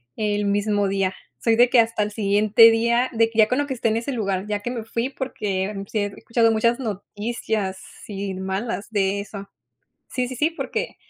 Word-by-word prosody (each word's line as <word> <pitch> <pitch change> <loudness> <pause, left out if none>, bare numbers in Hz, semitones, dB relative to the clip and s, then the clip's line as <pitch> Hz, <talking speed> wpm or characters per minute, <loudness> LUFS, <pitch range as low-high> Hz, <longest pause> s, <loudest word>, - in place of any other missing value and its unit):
el 210 -1 -1
mismo 205 0 +1
día. 195 -1 0 0.3
Soy 230 -1 +3
de 240 +2 +5
que 250 - +5
hasta 230 -1 +2
el 210 - -3
siguiente 210 +2 +5
día, 235 +2 +2
de 225 0 +3
que, 225 - -11
ya 215 - +7
con 250 +4 0
lo 290 - 0
que 265 - -3
esté 230 -1 0
en 220 - +1
ese 235 +4 -3
lugar, 200 -4 -2
ya 205 -1 -2
que 240 - -3
me 235 -3 -4
fui, 230 +3 -2
porque, 205 -8 -3 0.2
sí 220 - 0
he 205 - +1
escuchado 230 +3 +1
muchas 235 +3 +2
noticias, 210 -2 -3 0.3
sí, 200 -1 -5
malas 190 +4 -3
de 200 -1 +1
eso. 200 0 -8 0.6
Sí, 250 -1 -1
sí, 255 - -6
sí, 305 +5 +2
porque 455 +8 -4
220 Hz, 205 wpm, -23 LUFS, 200-235 Hz, 0.6 s, ya